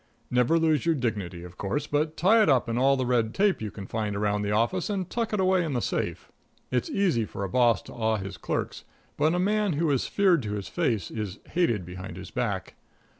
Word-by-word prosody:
Never 125 +6 +3
lose 160 -4 +2
your 165 -1 +2
dignity, 105 - -3
of 90 0 -12
course, 120 +10 -1
but 150 +2 -1
tie 220 +6 +5
it 210 - +4
up 130 -4 +3
in 115 - -1
all 135 +3 +3
the 130 - 0
red 120 -2 +1
tape 200 - +2
you 110 - -3
can 100 -1 -8
find 105 -1 -2
around 105 0 0
the 100 - -2
office, 115 - +1
and 190 -4 -2
tuck 230 +2 -2
it 210 - 0
away 185 -1 +3
in 155 -4 -2
the 125 - +1
safe. - - -3 0.4
It's 125 -2 0
easy 180 - +1
for 100 -1 -5
a 95 - -3
boss 120 -1 +3
to - - -11
awe 110 -1 0
his 95 -2 -6
clerks, - - -3 0.3
but 155 +3 +2
a - - +1
man 205 +1 +1
who 155 +1 +1
is 135 - +1
feared 185 -6 +3
to 105 -3 -4
his 100 -2 -4
face 105 -7 -1
is 105 -3 -4
hated 120 - +1
behind 90 +2 -8
his - - -9
back. - - -2
125 Hz, 230 wpm, -27 LUFS, 105-170 Hz, 0.4 s, tie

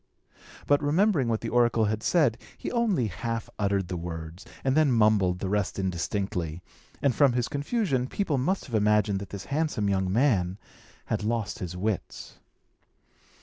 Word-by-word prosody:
But, 145 0 +3
remembering 155 - +2
what 115 -1 0
the - - -3
oracle 120 -2 +3
had 110 +1 -1
said, 130 -6 +2 0.2
he - - -5
only 225 - +1
half 115 +3 -4
uttered 100 -2 +1
the 90 - -4
words, 85 +1 -6 0.2
and 135 0 +1
then 155 -3 +4
mumbled 105 -6 +3
the 95 - -4
rest 100 0 -1
indistinctly; 90 -2 -2 0.4
and 140 -3 +3
from 140 -2 +4
his 125 0 0
confusion, 145 - -1
people 155 -4 -1
must 185 +10 0
have 130 - -12
imagined 105 -2 +2
that 100 - -8
this 100 -2 -7
handsome 150 -10 0
young 95 -1 0
man 100 -6 +2 0.5
had - - -2
lost 110 -2 -2
his 90 -1 -5
wits. 105 +1 -4
110 Hz, 160 wpm, -27 LUFS, 95-135 Hz, 0.5 s, then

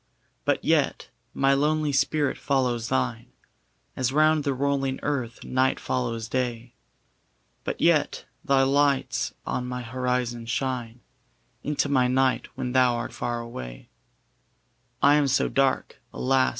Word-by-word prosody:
But - - 0
yet - - +1 0.2
my 135 0 +2
lonely 150 +2 +1
spirit 145 +1 +1
follows 125 -4 0
thine, 65 -1 -1 0.7
As 130 -1 0
round 155 +1 +3
the 140 -1 0
rolling 135 0 0
earth 130 -6 -2
night 130 +1 +1
follows 115 -3 -2
day: 120 -1 -3 0.9
But - - -4
yet - - +2 0.2
thy 135 -1 +3
lights 140 0 +1
on 125 0 -2
my 125 0 -4
horizon 125 -1 -2
shine 120 -1 -3 0.6
Into 145 +1 0
my 130 -3 +3
night 130 +1 +1
when 125 - -3
thou 125 -1 +4
art 120 0 -4
far 120 -1 -3
away; 65 - -8 1.1
I 145 +1 +6
am 145 -1 +2
so 135 +1 +2
dark, 135 -1 0
alas! 130 0 +2
130 Hz, 130 wpm, -26 LUFS, 120-140 Hz, 1.1 s, I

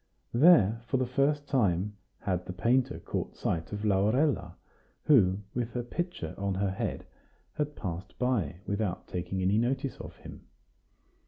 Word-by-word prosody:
There, 115 - +6
for 135 - +1
the 130 - +1
first 145 +3 +1
time, 105 -5 +1 0.3
had 90 -2 -2
the 90 - -4
painter 120 +8 +2
caught - - -4
sight 80 -1 -2
of 105 +1 -3
Laurella, 105 - +2 0.5
who, 100 -9 +5
with 120 -1 -2
her 120 - -2
pitcher 145 - -4
on 100 -1 -1
her 95 0 0
head, 95 - -3 0.5
had 150 -1 -2
passed 90 -1 -6
by 100 - 0
without 100 -3 -2
taking 90 +1 -3
any 100 +4 +3
notice 130 +3 -1
of - - -9
him. - - -12
105 Hz, 150 wpm, -30 LUFS, 95-130 Hz, 0.5 s, There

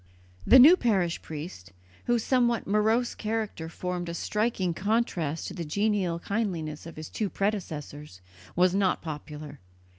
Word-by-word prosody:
The 260 - +9
new 295 +8 +10
parish 195 - 0
priest, 145 - -8 0.3
whose 240 -2 +1
somewhat 240 -4 +2
morose 220 +4 +2
character 215 -7 -3
formed 180 +1 -4
a 170 - -4
striking 210 -3 -1
contrast 185 -6 -1
to - - -8
the 175 - -5
genial 195 +1 0
kindliness 170 -6 -3
of 165 - -10
his 155 0 -7
two 210 -3 -3
predecessors, 150 - -4 0.4
was 180 +1 +4
not 195 -1 +1
popular. 150 -2 -7
185 Hz, 140 wpm, -27 LUFS, 160-220 Hz, 0.4 s, new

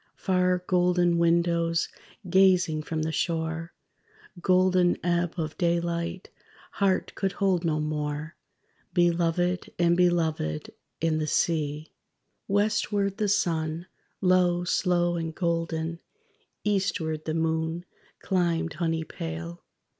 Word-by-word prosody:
Far, 180 -1 +1
golden 175 -1 +2
windows 170 0 +2 0.4
gazing 180 -4 +4
from 155 +1 -3
the 160 - -1
shore; 160 +1 -2 0.7
Golden 185 -1 +3
ebb 175 -1 +1
of 155 -2 -3
daylight; 170 0 -1 0.4
heart 195 -2 0
could 195 -1 -2
hold 190 -3 +1
no 155 -2 +1
more: 150 +1 -3 0.6
Belovèd 175 +1 +1
and 170 0 +3
Belovèd, 160 - 0 0.3
and 160 -1 +1
the 155 - -1
sea._ 155 -2 0 0.7
_Westward 205 -1 +1
the 210 -2 0
sun, 165 -4 0 0.4
low, 180 -2 +3
slow 175 -1 +1
and 160 -1 -4
golden; 165 -1 -1 0.6
Eastward 175 -6 -1
the 155 - -2
moon 160 +1 -1 0.4
climbed, 170 -4 0
honey 165 -1 0
pale. 85 - -6
170 Hz, 105 wpm, -27 LUFS, 160-180 Hz, 0.7 s, gazing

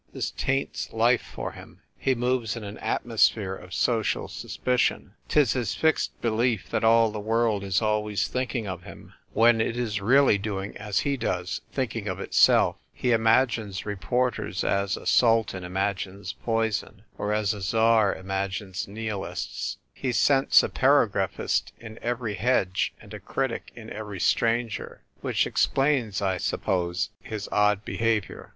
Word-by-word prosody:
This - - -3
taints 135 +1 -2
life 115 +2 +3
for - - -6
him: - - -14
he 135 - 0
moves 125 -2 0
in 115 - -6
an 105 +1 -8
at 110 - -2
mosphere 110 -4 +2
of 90 -1 -13
social 115 0 0
suspicion^ 125 -1 -1 0.2
'Tis 145 -6 +3
his 120 -6 -2
fixed 160 -1 +1
belief 115 -1 0
that 110 -1 0
all 115 0 +5
the 105 - -5
world 110 -1 +1
is 95 +2 0
always 105 -1 0
thinking 125 -3 -2
of 95 -2 -5
him, - - -13 0.2
when 115 +1 +5
it 115 +1 -1
is 110 -4 -2
really 125 0 +4
doing 100 -1 -4
as 105 -1 -1
he 140 -1 0
does 90 -6 -2
— - - -36
thinking 115 -5 -3
of 95 -1 -3
itself. - - +4
He 125 - -1
imagines 115 -3 +2
reporters 110 0 -1
as 100 0 0
a - - -11
sultan 115 -6 +3
imagines 95 +1 -3
poison, 110 -2 -2 0.2
or 105 - -1
as 105 0 +1
a 105 - -8
tsar 110 +1 +3
imagines 95 0 -3
nihilists; 100 - -4 0.2
he 130 - -2
scents 135 +3 +5
a - - -1
paragraphist - - +1
in 110 -1 -10
every 120 -2 -2
hedge, 100 -4 +1
and - - -13
a - - -6
critic - - -3
in - - -10
every 105 -2 -6
stranger." 115 +3 0 0.2
Which - - +1
explains, 130 -8 +1
I 95 -1 +1
suppose, 90 +1 -1
his 110 -2 -6
odd 105 0 +2
behaviour. 110 -5 -1
110 Hz, 155 wpm, -26 LUFS, 100-120 Hz, 0.2 s, all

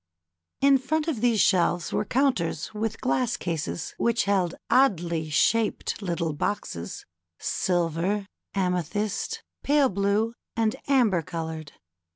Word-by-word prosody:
In 275 -1 +6
front 305 +4 -1
of 275 -10 -1
these 235 -3 +3
shelves 175 -3 +2
were - - 0
counters 225 - 0
with 220 +1 -2
glass 255 -2 +1
cases, 165 -1 -3
which 235 -1 +2
held 190 -4 +1
oddly 170 - +2
shaped 220 +9 +1
lit 175 -4 -2
tle 165 -3 -1
boxes, 120 - -3 0.3
silver, 175 +3 0 0.3
amethyst, 185 +2 -1 0.2
pale 285 -2 +3
blue, 200 +3 +1 0.2
and 225 -1 +1
amber 240 -11 +3
colored. 160 -3 -6
200 Hz, 120 wpm, -26 LUFS, 170-235 Hz, 0.3 s, In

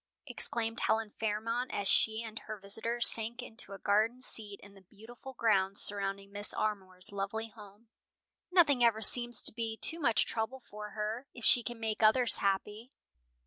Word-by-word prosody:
exclaimed 225 -1 -1
Helen 220 -1 -1
Fairmont 225 +3 -3
as 200 - -3
she 220 +3 +1
and 220 -1 -8
her 215 0 -9
visitor 225 +4 -4
sank 235 +2 +1
into 225 -4 -2
a - - -8
garden 215 +5 0
seat 210 -5 -1
in 200 0 -16
the 195 - -18
beautiful 225 +7 -14
grounds 200 -5 0
surrounding 200 -1 +3
Mrs. 205 +1 -3
Armour's 190 -3 -2
lovely 205 +3 -5
home. 210 0 -16 0.6
"Nothing 295 -9 +3
ever 225 -2 +2
seems 240 +2 +3
to - - +6
be 225 -1 -5
too 325 +7 +3
much 235 -8 +1
trouble 230 +4 -4
for 210 -3 -10
her, 220 +5 -4
if 240 - -8
she 245 - +5
can 240 0 -7
make 220 -1 -4
others 230 +3 +5
happy." 205 +4 -3
220 Hz, 170 wpm, -31 LUFS, 205-235 Hz, 0.6 s, to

